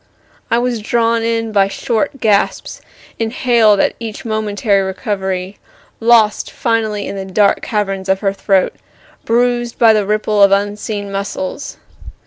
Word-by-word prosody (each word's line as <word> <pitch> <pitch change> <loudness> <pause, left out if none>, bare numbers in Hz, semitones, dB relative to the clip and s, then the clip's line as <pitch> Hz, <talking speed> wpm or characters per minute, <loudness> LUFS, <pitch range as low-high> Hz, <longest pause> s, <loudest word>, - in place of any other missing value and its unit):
I 230 - +2
was 240 -1 -1
drawn 230 +1 +1
in 225 -1 -1
by 200 -2 +3
short 255 +7 -2
gasps, 210 -3 0 0.4
inhaled 225 -2 +2
at - - +2
each 225 -1 -7
momentary 210 -2 0
recovery, 190 -1 -3 0.4
lost 225 -2 +3
finally 220 -3 -1
in - - -5
the 195 - -4
dark 200 +1 +2
caverns 195 -3 -2
of 190 0 +1
her 195 -2 0
throat, 195 -1 +1 0.5
bruised 240 0 0
by 225 -2 +6
the 210 -2 0
ripple 210 0 +1
of 200 0 +6
unseen 205 0 -1
muscles. 195 +4 -5
210 Hz, 135 wpm, -16 LUFS, 200-230 Hz, 0.5 s, by